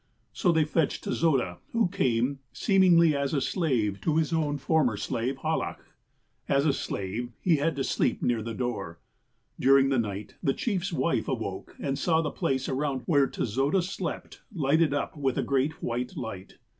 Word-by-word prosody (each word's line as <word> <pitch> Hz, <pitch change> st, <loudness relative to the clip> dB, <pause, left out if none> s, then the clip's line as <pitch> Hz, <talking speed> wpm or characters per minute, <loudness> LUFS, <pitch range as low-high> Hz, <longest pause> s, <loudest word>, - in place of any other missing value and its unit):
''So 180 Hz, -, +2 dB
they 160 Hz, -2 st, +3 dB
fetched 155 Hz, -1 st, 0 dB
Tezoda, 130 Hz, -, 0 dB
who 230 Hz, -4 st, +3 dB
came, 130 Hz, -3 st, 0 dB
seemingly 175 Hz, -6 st, +4 dB
as 140 Hz, +1 st, -1 dB
a -, -, +3 dB
slave 125 Hz, -, 0 dB
to 155 Hz, -1 st, +1 dB
his 160 Hz, 0 st, +1 dB
own 150 Hz, -3 st, 0 dB
former 140 Hz, -6 st, +1 dB
slave, 125 Hz, +6 st, -2 dB
Hallach. -, -, -2 dB, 0.6 s
"As 140 Hz, +1 st, +3 dB
a 145 Hz, -, +3 dB
slave, 110 Hz, +1 st, -4 dB
he 170 Hz, -4 st, +3 dB
had 160 Hz, +3 st, 0 dB
to 135 Hz, -, -1 dB
sleep -, -, 0 dB
near 120 Hz, -2 st, 0 dB
the 115 Hz, +1 st, -5 dB
door. 120 Hz, -10 st, -3 dB, 0.6 s
During 135 Hz, +1 st, +5 dB
the 135 Hz, -2 st, +2 dB
night, 105 Hz, -2 st, -4 dB
the 135 Hz, -4 st, +1 dB
chief's 195 Hz, -5 st, -1 dB
wife 135 Hz, -6 st, 0 dB
awoke, -, -, -4 dB
and 135 Hz, -1 st, -2 dB
saw 160 Hz, -2 st, +2 dB
the 155 Hz, -3 st, -1 dB
j^lace 130 Hz, 0 st, -1 dB
around 135 Hz, -1 st, -1 dB
where 145 Hz, -5 st, +3 dB
Tezoda 135 Hz, -, 0 dB
slept 185 Hz, -1 st, -5 dB
lighted 155 Hz, -2 st, +2 dB
up 145 Hz, +2 st, -2 dB
with 135 Hz, -4 st, -1 dB
a -, -, +1 dB
great 140 Hz, +4 st, 0 dB
white 125 Hz, +1 st, -3 dB
light. 100 Hz, -5 st, -7 dB
140 Hz, 170 wpm, -28 LUFS, 125-160 Hz, 0.6 s, During